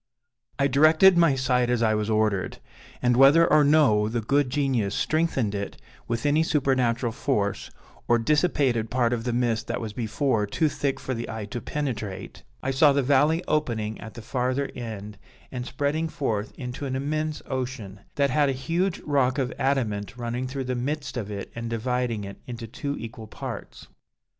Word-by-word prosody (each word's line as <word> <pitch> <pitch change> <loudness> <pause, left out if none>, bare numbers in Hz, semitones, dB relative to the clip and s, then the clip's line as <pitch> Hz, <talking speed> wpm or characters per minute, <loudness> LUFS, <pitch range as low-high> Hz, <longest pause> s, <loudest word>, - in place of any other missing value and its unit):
"I 140 - +2
directed 155 +7 +6
my 165 -5 +4
sight 125 -2 +1
as 120 -1 +1
I 110 -1 +3
was 105 0 -1
ordered, 110 -3 0 0.5
and 125 -1 +4
(whether 140 +6 +7
or 150 - +5
no 140 -9 +4
the 120 +1 -1
good 140 +4 +1
Genius 125 -7 0
strengthened 155 -9 0
it 100 0 -5 0.3
with 115 +2 -2
any 145 +2 +3
supernatural 130 -6 +1
force, 100 -2 -1 0.4
or 120 - +4
dissipated 130 -4 +1
part 120 -1 +1
of 115 -1 -3
the 120 - 0
mist 120 -2 0
that - - -2
was 110 -3 -5
before 115 -1 0
too 155 +9 +1
thick 140 -2 -2
for 130 - -3
the 115 -1 -5
eye 110 -2 -4
to 115 +3 -6
penetrate) 110 -9 -4 0.2
I - - 0
saw 140 +2 +5
the 140 0 +2
valley 145 +6 +3
opening 110 -8 -1
at 110 -1 -9
the 115 - -9
farther 130 +3 -1
end 105 -4 -7 0.3
and 125 -1 -5
spreading 145 +4 -1
forth 110 -9 -2
into 125 +2 -5
an 130 - -2
immense 155 +3 -2
ocean, 125 -7 -4 0.2
that 140 -1 +2
had 145 0 +3
a - - +1
huge 170 +8 -1
rock 135 -2 +1
of 130 -3 -1
adamant 115 -7 -1
running 120 +1 -3
through 135 +1 -4
the 130 0 -2
midst 140 +5 -3
of 110 -5 -4
it 100 -1 -6
and 115 0 -5
dividing 115 -1 -1
it 100 0 -8
into 120 -2 -6
two 140 +5 -4
equal 115 -1 -8
parts. - - -8
125 Hz, 180 wpm, -25 LUFS, 115-140 Hz, 0.5 s, whether